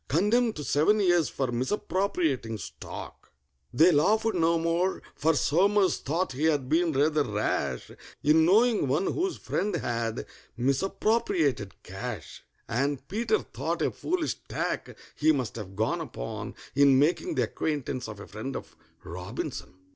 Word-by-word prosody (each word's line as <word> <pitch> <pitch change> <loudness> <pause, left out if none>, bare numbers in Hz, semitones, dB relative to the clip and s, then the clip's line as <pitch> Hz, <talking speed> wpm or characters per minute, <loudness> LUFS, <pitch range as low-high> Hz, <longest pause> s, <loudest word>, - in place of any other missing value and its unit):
Condemned 215 - +2
to 150 - -5
seven 160 +10 +3
years 175 -5 +3
for 130 -3 -2
misappropriating 140 - -1
stock!!! 90 - -9 0.4
They 160 +8 +6
laughed 215 +9 +3
no 170 -1 +3
more, 170 +3 0
for 160 +2 +2
SOMERS 190 +7 +3
thought 165 +7 -1
he 135 +5 -1
had 145 -5 +2
been 165 +3 +2
rather 150 +2 +2
rash 105 - -2 0.3
In 155 +2 +5
knowing 215 - +4
one 145 +9 +1
whose 370 +1 -1
friend 200 +1 -2
had 115 -7 -2 0.3
misappropriated 145 - 0
cash; 95 0 -7 0.3
And 135 +2 -1
PETER 235 - 0
thought - - -2
a - - +1
foolish 350 -1 -2
tack - - -3 0.2
he 155 +1 +3
must 130 -7 -2
have 100 -4 -7
gone 110 +3 0
upon - - -6 0.2
In 140 -1 +5
making 175 - +2
the - - +2
acquaintance 135 -5 -3
of 110 -2 -8
a 100 - -8
friend 110 +6 -6
of - - -7 0.3
ROBINSON. 90 +1 -6
150 Hz, 140 wpm, -28 LUFS, 125-185 Hz, 0.4 s, They